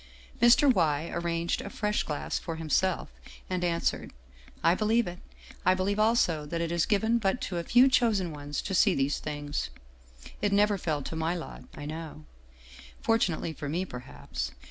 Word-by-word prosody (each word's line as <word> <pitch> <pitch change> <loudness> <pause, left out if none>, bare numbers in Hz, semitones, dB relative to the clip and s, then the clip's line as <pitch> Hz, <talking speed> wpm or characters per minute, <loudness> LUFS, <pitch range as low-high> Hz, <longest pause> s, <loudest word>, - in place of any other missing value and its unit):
Mr. 250 +3 +6
Y. 160 -4 +1
arranged 170 0 -1
a - - -6
fresh 210 +1 -1
glass 150 -2 -3
for 165 - -5
himself, 165 +3 0 0.4
and 180 -1 -1
answered: 170 -1 -1 0.3
" - - -23
I 165 - +5
believe 220 +4 +2
it. 175 0 -6 0.4
I 185 +1 +4
believe 200 +3 0
also 215 -9 +2
that 170 +3 -3
it 170 0 -1
is 170 -1 +1
given 220 +3 +2
but 200 +2 0
to 180 - -3
a - - -3
few 245 +8 +6
chosen 220 -9 +2
ones 145 -1 -5
to 195 - -3
see 185 - +4
these 135 +1 0
things. 145 -1 -4 0.7
It 205 0 +1
never 205 0 +3
fell 155 -5 -1
to 160 - -5
my 160 +2 0
lot, 170 - -8
I 145 - -7
know. 155 - -7 0.7
Fortunately 180 -8 +1
for 145 -1 -6
me, 175 +5 -1
perhaps. 65 - -6
170 Hz, 175 wpm, -29 LUFS, 155-205 Hz, 0.7 s, Mr